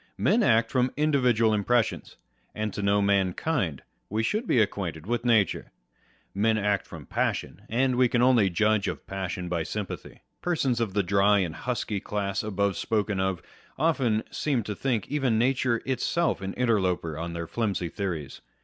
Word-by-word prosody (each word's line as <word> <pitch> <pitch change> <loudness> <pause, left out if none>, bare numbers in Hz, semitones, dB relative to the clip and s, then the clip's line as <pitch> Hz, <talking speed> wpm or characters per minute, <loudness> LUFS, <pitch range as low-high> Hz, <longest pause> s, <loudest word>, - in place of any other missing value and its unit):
Men 235 - +3
act 115 - +3
from 125 -1 +2
individual 125 -7 +3
impressions; 110 +3 0 0.4
and 105 -2 -2
to - - -4
know 100 0 +2
mankind, 100 - 0 0.3
we 110 +2 -1
should 215 - -1
be - - +2
ac 105 -3 +4
quainted 85 -5 -5
with 120 +2 -1
nature. 115 -5 +2 0.6
Men 110 +3 +2
act 100 -2 0
from - - -10
passion; - - -2
and 130 +2 +1
we 125 0 +4
can 120 0 +2
only 120 -6 +5
judge 110 +3 +2
of - - -5
passion 90 -2 -4
by 85 -1 -1
sympathy. 100 +4 -6 0.2
Persons 135 -9 0
of 105 -4 -2
the 100 - +2
dry 100 +2 +3
and 90 -5 0
husky 115 -5 -2
class 100 -1 -2
above 100 -2 -1
spoken 105 -3 -1
of, 95 -2 -1 0.3
often 135 -8 +1
seem 135 -6 0
to 105 - -4
think 115 -1 -1
even 135 -6 +1
nature 125 -1 +1
itself 145 +4 0
an 95 0 -4
interloper 95 -9 0
on 85 +2 -5
their 85 0 -4
flimsy 100 -3 -2
theories. 85 -7 -4
110 Hz, 165 wpm, -27 LUFS, 95-125 Hz, 0.6 s, only